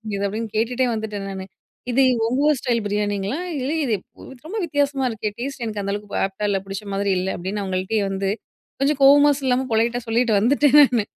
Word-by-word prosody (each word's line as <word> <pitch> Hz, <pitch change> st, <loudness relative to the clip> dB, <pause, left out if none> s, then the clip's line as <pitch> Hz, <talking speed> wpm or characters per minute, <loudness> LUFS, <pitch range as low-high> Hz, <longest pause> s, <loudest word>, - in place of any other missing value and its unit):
இது 200 Hz, -, -2 dB
அப்டீன்னு 220 Hz, +2 st, -4 dB
கேட்டுட்டே 245 Hz, +3 st, +1 dB
வந்துட்டேன் 215 Hz, -2 st, -4 dB
நானு. 190 Hz, -1 st, -6 dB, 0.5 s
இது 265 Hz, +3 st, +3 dB, 0.2 s
உங்க 250 Hz, +4 st, 0 dB
ஊர் 300 Hz, -3 st, +3 dB
ஸ்டைல் 240 Hz, -3 st, 0 dB
பிரியாணிங்களா? 205 Hz, +4 st, -1 dB, 0.2 s
இல்ல 260 Hz, +3 st, -2 dB
இது 230 Hz, -, 0 dB, 0.5 s
ரொம்ப 415 Hz, +7 st, -5 dB
வித்தியாசமா 285 Hz, -3 st, 0 dB
இருக்கே? 215 Hz, -2 st, -3 dB
டேஸ்ட் 265 Hz, -1 st, -4 dB
எனக்கு 210 Hz, -2 st, -3 dB
அந்த 200 Hz, 0 st, -2 dB
அளவுக்கு 205 Hz, 0 st, -5 dB
ஆப்டா 195 Hz, +2 st, -4 dB
இல்ல. 195 Hz, -1 st, +1 dB
புடிச்ச 195 Hz, +1 st, -6 dB
மாதிரி 200 Hz, 0 st, 0 dB
இல்ல. 185 Hz, +1 st, -2 dB
அப்பிடின்னு 195 Hz, +3 st, -4 dB
அவுங்கள்ட்டயே 190 Hz, +3 st, -1 dB
வந்து 195 Hz, 0 st, -2 dB, 0.5 s
கொஞ்சம் 285 Hz, 0 st, +1 dB
கோவமா 290 Hz, +1 st, +7 dB
சொல்லாம, 260 Hz, -1 st, +1 dB
பொலைட்டா 230 Hz, +2 st, +1 dB
சொல்லிட்டு 230 Hz, 0 st, +2 dB
வந்துட்டேன் 285 Hz, +5 st, +4 dB
நானு 240 Hz, -6 st, +3 dB
225 Hz, 180 wpm, -22 LUFS, 200-260 Hz, 0.5 s, கோவமா